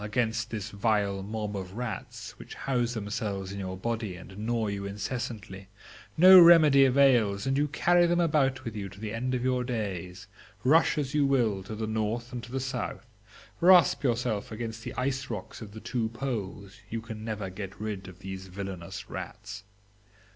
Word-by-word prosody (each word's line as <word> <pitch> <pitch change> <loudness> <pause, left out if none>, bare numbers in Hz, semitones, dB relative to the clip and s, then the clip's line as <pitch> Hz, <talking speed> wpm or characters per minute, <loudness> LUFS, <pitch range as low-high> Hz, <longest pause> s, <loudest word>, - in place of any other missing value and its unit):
against 115 +2 -1
this 110 -2 -5
vile 100 -2 0
mob 105 +1 -4
of 95 -1 -6
rats, 120 -4 -5
which - - -10
house 120 -2 -1
themselves 100 -2 -3
in 100 - -6
your 95 -1 -4
body 110 -2 -3
and 95 +2 -11
gnaw 110 +2 -1
you 100 -1 -3
incessantly, 100 -1 -5 0.5
no 185 +3 +10
remedy 155 -5 +8
avails, 125 -6 +3
and 135 0 +1
you 145 +2 +2
carry 175 +4 +3
them 175 0 +2
about 135 -6 +1
with 115 -1 -5
you 100 -2 -4
to 100 +1 -14
the 105 0 -5
end 125 +3 -1
of 125 - -2
your 125 -1 +1
days; 100 -5 -4 0.4
rush 155 +6 +4
as 140 -3 -2
you 150 -1 +3
will 120 -8 +2
to 105 +3 -7
the 110 +1 -3
north 110 +2 -2
and 120 - -4
to 125 - -10
the 135 - -2
south, 130 -2 -4 0.5
rasp 175 -2 +6
yourself 120 -5 -1
against 115 0 -5
the - - -6
ice 135 +1 -2
rocks 105 -2 -6
of 105 -2 -8
the 110 - -9
two 115 -1 -2
poles, 105 -5 -5
you 115 - -3
can 110 -1 -8
never 105 -4 -4
get 95 0 -7
rid 105 -3 -5
of 90 -2 -11
these 95 0 -7
villainous 95 -2 -7
rats? 110 -2 -8
110 Hz, 185 wpm, -28 LUFS, 100-130 Hz, 0.5 s, no